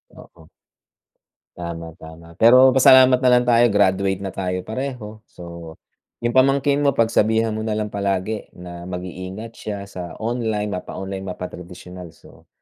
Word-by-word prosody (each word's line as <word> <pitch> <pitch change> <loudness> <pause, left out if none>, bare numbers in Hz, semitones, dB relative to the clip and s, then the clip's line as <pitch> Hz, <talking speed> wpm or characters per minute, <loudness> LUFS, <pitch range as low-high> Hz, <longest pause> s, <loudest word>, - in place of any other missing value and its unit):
Oo. 80 -2 -17 1.1
Tama, 85 -1 -6
tama. 80 +1 -13
Pero 125 +3 +7
pasalamat 130 0 +6
na 130 - +1
lang 125 0 +4
tayo 120 0 +4
graduate 95 -1 +1
na 95 - -4
tayo 90 -1 -3
pareho. 110 -3 -6
So, 85 -2 -11 0.5
yung 120 - +1
pamangkin 135 +2 +3
mo 140 -2 +1
pagsabihan 110 0 +2
mo 110 - -4
na 110 -1 -2
lang 105 -1 -3
palagi 100 +1 -2
na 90 0 -10
mag-iingat 95 +4 -7
siya 100 -3 -7
sa 90 -3 -8
online, 110 -3 -2
mapa-online, 95 +1 -6
mapa-tradisyonal. 90 -1 -9
So, - - -20
100 Hz, 140 wpm, -21 LUFS, 90-115 Hz, 1.1 s, Pero